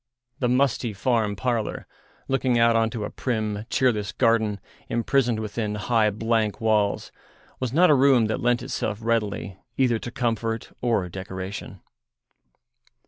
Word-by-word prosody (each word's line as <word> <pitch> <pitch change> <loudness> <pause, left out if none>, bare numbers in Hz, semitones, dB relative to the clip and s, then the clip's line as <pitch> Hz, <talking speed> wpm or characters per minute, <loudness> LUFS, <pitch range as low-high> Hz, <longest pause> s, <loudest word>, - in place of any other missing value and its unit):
The 125 - +1
musty 125 -3 +1
farm 105 0 0
parlour, 115 -1 -2 0.4
looking 130 -2 +1
out 115 0 +4
on 115 0 +3
to 110 -1 -5
a - - -6
prim, 110 -4 -2
cheerless 110 -6 +1
garden 110 -3 +2 0.3
imprisoned 120 0 +1
within 105 0 -3
high, 110 0 +2
blank 110 0 0
walls, 105 -2 +1 0.5
was 130 -3 -2
not 170 +4 +5
a - - +7
room 135 -4 +5
that 110 - -2
lent 120 0 +1
itself 105 -1 -3
readily 105 -4 -1 0.2
either 125 -4 +2
to 120 - -6
comfort 115 -2 -2
or 115 -7 +1
decoration. 95 +1 -7
115 Hz, 140 wpm, -25 LUFS, 105-120 Hz, 0.5 s, a